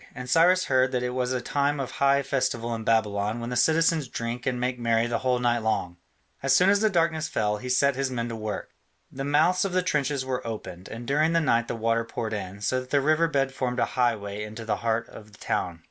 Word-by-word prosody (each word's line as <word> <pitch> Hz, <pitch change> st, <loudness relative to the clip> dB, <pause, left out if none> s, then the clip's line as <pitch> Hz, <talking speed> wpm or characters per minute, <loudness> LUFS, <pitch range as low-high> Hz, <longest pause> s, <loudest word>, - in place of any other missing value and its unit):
And 125 Hz, 0 st, -7 dB
Cyrus 175 Hz, +6 st, +4 dB
heard 130 Hz, -1 st, +2 dB
that 125 Hz, -1 st, 0 dB
it 125 Hz, -, -1 dB
was 125 Hz, 0 st, -1 dB
a 130 Hz, -1 st, -1 dB
time 145 Hz, +2 st, 0 dB
of 135 Hz, -, -3 dB
high 140 Hz, 0 st, +2 dB
festival 125 Hz, -4 st, -1 dB
in 115 Hz, -1 st, -4 dB
Babylon 105 Hz, 0 st, +1 dB
when 120 Hz, +1 st, -5 dB
the -, -, -2 dB
citizens 160 Hz, +1 st, +3 dB
drink 120 Hz, +1 st, -4 dB
and 125 Hz, -2 st, 0 dB
make 125 Hz, 0 st, -2 dB
merry 115 Hz, -1 st, +2 dB
the 120 Hz, -1 st, -1 dB
whole 125 Hz, -1 st, +1 dB
night 120 Hz, -1 st, +1 dB
long. 110 Hz, -6 st, -1 dB, 0.5 s
As 135 Hz, 0 st, +3 dB
soon 180 Hz, +8 st, +5 dB
as 205 Hz, -, +3 dB
the 220 Hz, -, +4 dB
darkness 165 Hz, -4 st, +1 dB
fell, 105 Hz, -1 st, 0 dB
he 125 Hz, +4 st, -7 dB
set 140 Hz, +2 st, +3 dB
his 135 Hz, 0 st, -1 dB
men 120 Hz, -2 st, -3 dB
to 115 Hz, -, -4 dB
work. 110 Hz, -3 st, -5 dB, 0.4 s
The 135 Hz, -, -5 dB
mouths 160 Hz, +6 st, +3 dB
of 195 Hz, -2 st, -2 dB
the 185 Hz, 0 st, +2 dB
trenches 145 Hz, -5 st, 0 dB
were 130 Hz, -2 st, -3 dB
opened, 105 Hz, -4 st, -7 dB
and 115 Hz, +2 st, -7 dB
during 150 Hz, +5 st, +2 dB
the 165 Hz, -, +4 dB
night 120 Hz, -7 st, +1 dB
the -, -, -3 dB
water 115 Hz, 0 st, 0 dB
poured 115 Hz, -1 st, -4 dB
in, 100 Hz, -1 st, -5 dB
so 130 Hz, +5 st, 0 dB
that 130 Hz, 0 st, -9 dB
the 140 Hz, -, +3 dB
river 155 Hz, +4 st, +3 dB
bed 135 Hz, -3 st, 0 dB
formed 125 Hz, -2 st, -2 dB
a -, -, +2 dB
highway 105 Hz, -5 st, 0 dB
into 110 Hz, +2 st, -8 dB
the 110 Hz, -, 0 dB
heart 115 Hz, 0 st, -1 dB
of 105 Hz, 0 st, -13 dB
the -, -, -15 dB
town. 85 Hz, -2 st, -2 dB
125 Hz, 245 wpm, -26 LUFS, 115-140 Hz, 0.5 s, soon